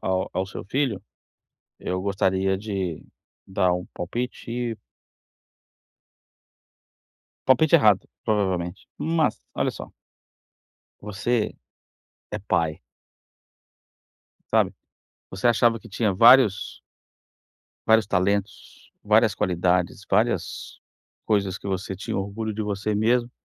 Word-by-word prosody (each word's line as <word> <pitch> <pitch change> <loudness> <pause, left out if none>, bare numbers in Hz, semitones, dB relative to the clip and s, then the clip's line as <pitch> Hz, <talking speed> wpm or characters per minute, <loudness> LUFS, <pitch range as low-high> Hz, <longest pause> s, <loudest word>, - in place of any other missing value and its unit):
ao 95 0 -1
ao 95 +1 -1
seu 95 - -8
filho, 120 -3 -1 0.8
eu 90 0 -2
gostaria 95 -1 +1
de 95 -5 -4 0.4
dar 90 -1 +1
um 90 0 -3
palpite 120 +7 -5
e 120 -1 -2 2.7
Palpite 145 +5 +5
errado, 105 - +5 0.2
provavelmente. 95 -5 -1
Mas, 160 -1 0
olha - - 0
só - - -9 1.1
você 105 +3 -1 0.8
é 105 - -3
pai 80 -6 -1 1.7
sabe? - - +3 0.6
Você 95 +6 -2
achava 115 0 +3
que 115 - -13
tinha 105 0 0
vários 115 -1 +5 1.1
vários 110 -2 +5
talentos, 100 +1 -2
várias - - +4
qualidades, 90 0 0
várias - - 0 0.5
coisas 100 -3 +1
que - - -10
você 95 0 -3
tinha 95 +3 -5
orgulho 105 +3 -3
de 110 - -3
você 105 +1 -2
mesmo 120 +3 +2
100 Hz, 100 wpm, -24 LUFS, 95-115 Hz, 2.7 s, Palpite